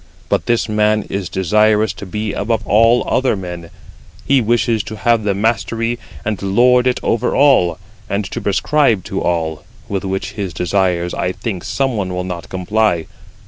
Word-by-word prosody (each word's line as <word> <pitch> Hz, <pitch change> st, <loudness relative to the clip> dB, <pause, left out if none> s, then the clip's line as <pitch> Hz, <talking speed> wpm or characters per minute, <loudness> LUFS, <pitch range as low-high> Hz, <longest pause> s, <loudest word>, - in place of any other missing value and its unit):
But -, -, 0 dB
this 120 Hz, -2 st, +1 dB
man 105 Hz, 0 st, +2 dB
is 95 Hz, -2 st, -3 dB
desirous 105 Hz, +3 st, +2 dB
to 100 Hz, -, -9 dB
be 105 Hz, +2 st, -3 dB
above 110 Hz, +1 st, -1 dB
all 115 Hz, +4 st, +4 dB
other 130 Hz, -3 st, +1 dB
men; 90 Hz, -3 st, -7 dB, 0.6 s
he 135 Hz, -2 st, +3 dB
wishes 115 Hz, 0 st, +1 dB
to 110 Hz, -1 st, -6 dB
have 115 Hz, +2 st, +2 dB
the 100 Hz, -2 st, 0 dB
mastery, 115 Hz, +2 st, -1 dB, 0.3 s
and 105 Hz, -1 st, -2 dB
lord 125 Hz, +6 st, +3 dB
it 125 Hz, -, +1 dB
over 115 Hz, -, 0 dB
all, 130 Hz, -, +4 dB, 0.3 s
and 100 Hz, +1 st, -1 dB
to -, -, -4 dB
prescribe 110 Hz, -, +2 dB
to 95 Hz, +1 st, -4 dB
all; 80 Hz, -3 st, -1 dB, 0.2 s
with 100 Hz, -2 st, -3 dB
which 95 Hz, 0 st, -3 dB
his 95 Hz, -5 st, -5 dB
desires 90 Hz, -1 st, 0 dB
I 90 Hz, -, -1 dB
think 95 Hz, -6 st, -5 dB
some 135 Hz, -3 st, -1 dB
one 95 Hz, -3 st, -2 dB
will 90 Hz, -, -2 dB
not 90 Hz, -3 st, -6 dB
comply. 95 Hz, -2 st, 0 dB
105 Hz, 170 wpm, -17 LUFS, 95-115 Hz, 0.6 s, all